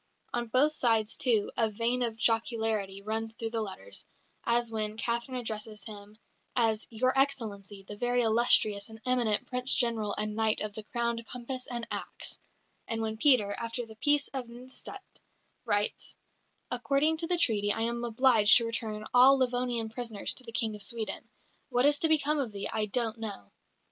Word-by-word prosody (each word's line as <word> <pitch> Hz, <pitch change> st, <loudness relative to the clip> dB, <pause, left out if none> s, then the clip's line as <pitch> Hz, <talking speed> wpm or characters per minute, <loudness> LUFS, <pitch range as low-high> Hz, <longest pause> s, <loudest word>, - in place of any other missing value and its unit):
On 240 Hz, 0 st, -1 dB
both 265 Hz, +7 st, +3 dB
sides, 225 Hz, -6 st, +1 dB
too, 225 Hz, -5 st, +1 dB
a 225 Hz, -1 st, +2 dB
vein 230 Hz, +4 st, 0 dB
of 230 Hz, -2 st, 0 dB
jocularity 225 Hz, -3 st, +1 dB
runs 220 Hz, +1 st, -3 dB
through 225 Hz, -1 st, -4 dB
the 225 Hz, -1 st, -1 dB
letters, 215 Hz, -, -5 dB, 0.4 s
as 235 Hz, 0 st, +1 dB
when 215 Hz, -1 st, -3 dB
Catherine 235 Hz, +3 st, -2 dB
addresses 215 Hz, -3 st, -6 dB
him 210 Hz, -1 st, -9 dB, 0.4 s
as 225 Hz, -2 st, +1 dB
"Your 255 Hz, +3 st, +1 dB
Excellency, 215 Hz, -8 st, -1 dB
the 205 Hz, -, -8 dB
very 245 Hz, +2 st, +1 dB
illustrious 220 Hz, -2 st, +3 dB
and 220 Hz, 0 st, -11 dB
eminent 245 Hz, -4 st, +1 dB
Prince 250 Hz, +1 st, +2 dB
General 225 Hz, -5 st, +1 dB
and 210 Hz, 0 st, -2 dB
Knight 220 Hz, -1 st, +1 dB
of 210 Hz, -1 st, -3 dB
the 220 Hz, -, -6 dB
crowned 235 Hz, 0 st, -2 dB
Compass 255 Hz, +1 st, -5 dB
and 240 Hz, -1 st, -4 dB
Axe"; -, -, -5 dB, 0.5 s
and 225 Hz, -1 st, -2 dB
when 220 Hz, 0 st, -3 dB
Peter, 220 Hz, -5 st, +4 dB
after 230 Hz, +1 st, -4 dB
the 220 Hz, -1 st, -13 dB
Peace 290 Hz, +3 st, +2 dB
of 260 Hz, -3 st, -5 dB
Nystadt, 250 Hz, +2 st, -7 dB, 0.5 s
writes: 205 Hz, 0 st, -1 dB, 0.6 s
"According 280 Hz, +5 st, +1 dB
to 330 Hz, +1 st, -1 dB
the 355 Hz, 0 st, +1 dB
Treaty 205 Hz, -9 st, +2 dB
I 225 Hz, -, -1 dB
am 235 Hz, +1 st, -1 dB
obliged 230 Hz, -2 st, +6 dB
to 235 Hz, -, +1 dB
return 220 Hz, -2 st, -3 dB
all 260 Hz, +2 st, +7 dB
Livonian 245 Hz, -3 st, 0 dB
prisoners 225 Hz, -2 st, -2 dB
to 255 Hz, -, -12 dB
the 230 Hz, -, -9 dB
King 225 Hz, -1 st, 0 dB
of 210 Hz, -, -11 dB
Sweden. 225 Hz, 0 st, -2 dB, 0.4 s
What 245 Hz, 0 st, +2 dB
is 290 Hz, 0 st, +4 dB
to 325 Hz, -, +2 dB
become 305 Hz, -1 st, +2 dB
of 255 Hz, -6 st, -2 dB
thee, 200 Hz, -1 st, -4 dB
I 215 Hz, -1 st, 0 dB
don't 225 Hz, +1 st, -2 dB
know." 205 Hz, -, -6 dB
230 Hz, 175 wpm, -30 LUFS, 215-250 Hz, 0.6 s, all